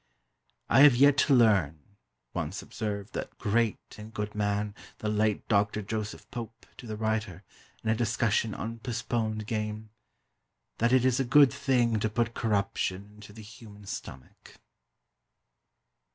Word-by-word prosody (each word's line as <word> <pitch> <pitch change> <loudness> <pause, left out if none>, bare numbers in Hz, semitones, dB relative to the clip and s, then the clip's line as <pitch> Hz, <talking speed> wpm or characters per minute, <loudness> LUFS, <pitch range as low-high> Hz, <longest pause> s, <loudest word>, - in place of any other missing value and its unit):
"I - - +4
have 145 -4 +8
yet 140 +3 +6
to 140 - +4
learn" 100 - +4 0.6
once 85 +3 -4
observed 105 -1 -5
that - - -6
great 115 0 +1 0.2
and 105 +1 -9
good 105 -1 -4
man, 105 0 -1 0.2
the 105 - -3
late 105 0 0
Doctor 105 0 +1
Joseph 110 0 -5
Pope, 115 -1 -8
to 120 - -10
the 110 -1 -5
writer, 110 -4 -2 0.4
in 110 - -1
a - - +4
discussion 110 -1 0
on 115 +3 -5
"postponed" 115 -2 -2
game, 105 0 -4 0.9
"that 115 +1 +2
it 130 -1 +4
is 130 0 +2
a - - +2
good 135 +2 +5
thing 120 -4 +1
to 110 - 0
put 115 +1 -1
corruption 100 -2 -1
into 105 0 -13
the 110 +1 -11
human 105 -1 -13
stomach." 65 -9 -9
110 Hz, 145 wpm, -28 LUFS, 105-115 Hz, 0.9 s, have